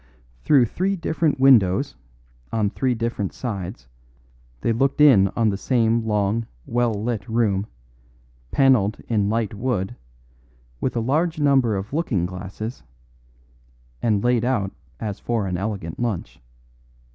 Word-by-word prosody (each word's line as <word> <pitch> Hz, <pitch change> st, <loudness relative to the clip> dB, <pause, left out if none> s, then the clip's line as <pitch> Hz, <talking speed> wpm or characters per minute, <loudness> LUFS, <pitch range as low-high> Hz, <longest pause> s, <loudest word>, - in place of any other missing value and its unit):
Through 135 Hz, -5 st, +5 dB
three 190 Hz, -, -1 dB
different 160 Hz, -4 st, 0 dB
windows 130 Hz, -2 st, +4 dB, 0.6 s
on 105 Hz, -3 st, 0 dB
three 130 Hz, -2 st, 0 dB
different 115 Hz, -4 st, -2 dB
sides 100 Hz, -, -5 dB, 0.7 s
they 115 Hz, -, +1 dB
looked 135 Hz, +5 st, 0 dB
in 130 Hz, -10 st, +7 dB
on 115 Hz, -2 st, +2 dB
the 100 Hz, -, -1 dB
same 115 Hz, -2 st, +1 dB
long, 105 Hz, +2 st, 0 dB, 0.2 s
well 120 Hz, 0 st, +1 dB
lit 110 Hz, -1 st, -3 dB
room, 110 Hz, -3 st, +1 dB, 0.8 s
panelled 120 Hz, -, +3 dB
in 105 Hz, -3 st, +1 dB
light 110 Hz, -2 st, -1 dB
wood, 105 Hz, -1 st, -2 dB, 0.8 s
with 130 Hz, -, -2 dB
a -, -, +1 dB
large 160 Hz, +8 st, 0 dB
number 135 Hz, -7 st, +3 dB
of 95 Hz, +6 st, -5 dB
looking 125 Hz, -, 0 dB
glasses, 95 Hz, +6 st, -6 dB, 1.2 s
and 105 Hz, -3 st, +1 dB
laid 120 Hz, -1 st, +2 dB
out 120 Hz, -6 st, 0 dB, 0.3 s
as 105 Hz, -3 st, -4 dB
for 115 Hz, -4 st, -1 dB
an 90 Hz, -2 st, -2 dB
elegant 95 Hz, -4 st, -4 dB
lunch. 115 Hz, -, -3 dB
115 Hz, 130 wpm, -23 LUFS, 100-130 Hz, 1.2 s, in